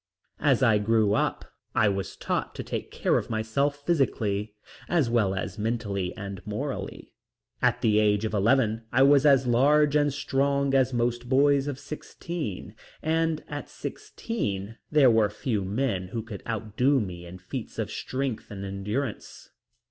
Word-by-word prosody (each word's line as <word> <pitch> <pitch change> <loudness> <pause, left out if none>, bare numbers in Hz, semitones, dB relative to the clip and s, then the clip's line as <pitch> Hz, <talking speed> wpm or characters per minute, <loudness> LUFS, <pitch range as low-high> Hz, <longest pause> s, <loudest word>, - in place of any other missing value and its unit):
As 135 -3 +3
I 110 -4 +5
grew 110 -1 +2
up - - 0 0.3
I 110 - +4
was 95 -2 -2
taught - - -2
to - - -5
take - - -4
care - - +1
of - - -8
myself 140 +6 -1
physically, 110 -10 0 0.3
as 155 -9 +2
well 105 -5 +2
as 100 +2 -4
mentally 105 -5 -2
and 100 -2 -6
morally. 130 +7 -5 0.5
At - - +2
the 105 -1 +3
age 105 0 +2
of 110 - -3
eleven 115 +1 +2
I 130 - +4
was 140 +1 +6
as 135 -2 +5
large 145 +5 +4
and 145 -1 +3
strong 140 0 0
as 130 -1 +3
most 120 0 -1
boys 140 +1 +4
of 140 -3 -3
sixteen, 150 - -6 0.3
and 160 0 +1
at - - -6
sixteen 105 - -5
there 145 -5 +6
were 110 -2 +3
few 105 0 -2
men 100 -2 -1
who 115 +4 -4
could 105 -3 -8
outdo 115 +5 +1
me 90 -5 -5
in 90 +2 -9
feats 100 +7 -7
of - - -2
strength 130 -3 -3
and 100 -1 -6
endurance. 105 +5 -4
115 Hz, 155 wpm, -27 LUFS, 105-140 Hz, 0.5 s, was